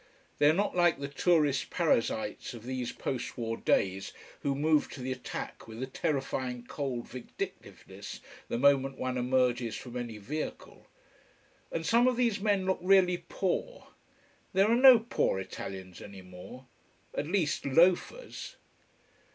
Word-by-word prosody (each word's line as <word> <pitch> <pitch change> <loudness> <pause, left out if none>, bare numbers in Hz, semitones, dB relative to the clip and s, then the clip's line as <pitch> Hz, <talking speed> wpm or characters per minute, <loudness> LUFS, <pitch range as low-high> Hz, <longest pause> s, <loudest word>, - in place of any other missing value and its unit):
They 145 - +6
are - - +5
not 200 +3 0
like 175 -3 +4
the 140 - -3
tourist 145 -1 +2
parasites 115 -10 0
of 115 - -10
these 125 -1 -3
post 130 -3 -4
war 115 -1 -2
days, 95 -3 0 0.3
who 140 -1 -1
move 150 +1 +2
to - - -9
the 130 +1 -3
attack 125 -2 -6
with 115 +3 -6
a - - 0
terrifying 130 -3 -2
cold 130 -5 -4
vindictiveness 125 -1 -8 0.3
the - - -2
moment 135 0 +3
one 130 0 -2
emerges 125 -2 +1
from 125 +2 -8
any 120 -3 -4
vehicle. 145 +10 -6 0.8
And 165 -1 -3
some 235 +7 +4
of 250 -2 +2
these 235 -5 +2
men 200 -2 +1
look 190 0 +1
really 180 -2 +4
poor. - - -2 0.6
There 195 +3 +4
are - - +5
no 255 0 +9
poor 225 - 0
Italians 95 -1 -7
any 100 -2 -10
more: 90 +8 -11 0.5
at 145 - -2
least, 170 -4 0
loafers. 180 - +1
135 Hz, 145 wpm, -30 LUFS, 120-180 Hz, 0.8 s, no